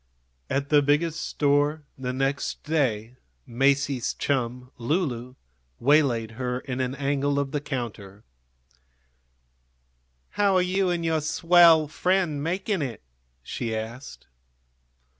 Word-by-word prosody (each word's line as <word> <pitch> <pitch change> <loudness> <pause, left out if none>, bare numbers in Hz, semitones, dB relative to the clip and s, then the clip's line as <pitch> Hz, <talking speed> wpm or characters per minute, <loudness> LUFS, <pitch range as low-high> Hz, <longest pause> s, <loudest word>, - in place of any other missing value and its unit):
At 140 +1 -1
the 150 -1 +5
Biggest 150 +3 +1
Store 145 +1 +1
the 125 -1 -4
next 135 +2 -2
day 125 -7 -1 0.3
Masie's 135 +1 +1
chum, 125 -2 -2
Lulu, 125 -3 -2 0.4
waylaid 125 -5 +3
her 125 0 -1
in 130 -1 -5
an 130 +1 -2
angle 140 0 0
of 140 -1 -1
the 145 - -2
counter. 115 -8 -6 2.1
"How 200 -2 +2
are 185 - +4
you 185 +1 +1
and 170 -1 -1
your 160 -1 +1
swell 165 0 +5
friend 175 -2 0
making 185 +4 -1
it? 120 - -5 0.4
she 115 - -4
asked. 115 +5 -7
140 Hz, 115 wpm, -25 LUFS, 125-160 Hz, 2.1 s, the